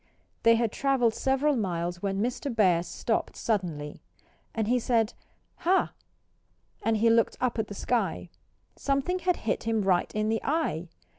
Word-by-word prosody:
They 230 0 +6
had 230 -2 +1
travelled 265 -4 +2
several 270 +4 +1
miles 175 -5 -2
when 195 0 -1
Mr. 250 +3 -2
Bear 185 -6 +4
stopped 220 +6 -2
suddenly. 170 -9 -2 0.5
And 220 -2 0
he 250 +2 +3
said, 225 -2 +1 0.4
"Hah!" 375 +3 +2 0.9
And 225 -1 +1
he 230 +2 +4
looked 230 -1 +3
up 245 -2 0
at 215 - -1
the 205 - -8
sky. 195 -7 -1 0.4
Something 280 +7 0
had 360 0 +1
hit 225 - -1
him 225 -2 +1
right 185 -2 +2
in 215 0 0
the 225 0 0
eye. 275 - -1
225 Hz, 155 wpm, -28 LUFS, 195-255 Hz, 0.9 s, They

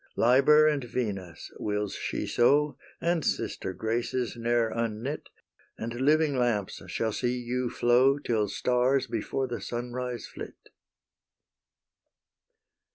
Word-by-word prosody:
Liber 140 +6 +6
and 150 -3 +1
Venus, 100 -8 -4
wills 105 -1 -2
she - - -3
so, 145 +3 +3 0.2
And 170 -2 0
sister - - -2
Graces, 115 +5 -2
ne'er 120 -1 +1
unknit, 115 +5 -3 0.5
And 115 +1 -4
living 150 +1 +3
lamps 120 -6 0
shall 110 -1 -1
see 125 +2 -1
you 125 +1 -2
flow 125 +4 +4
Till 110 -7 0
stars 125 +5 +2
before 120 +4 -2
the 120 -4 -5
sunrise 120 +2 -4
flit. - - -10
120 Hz, 110 wpm, -28 LUFS, 115-135 Hz, 0.5 s, Liber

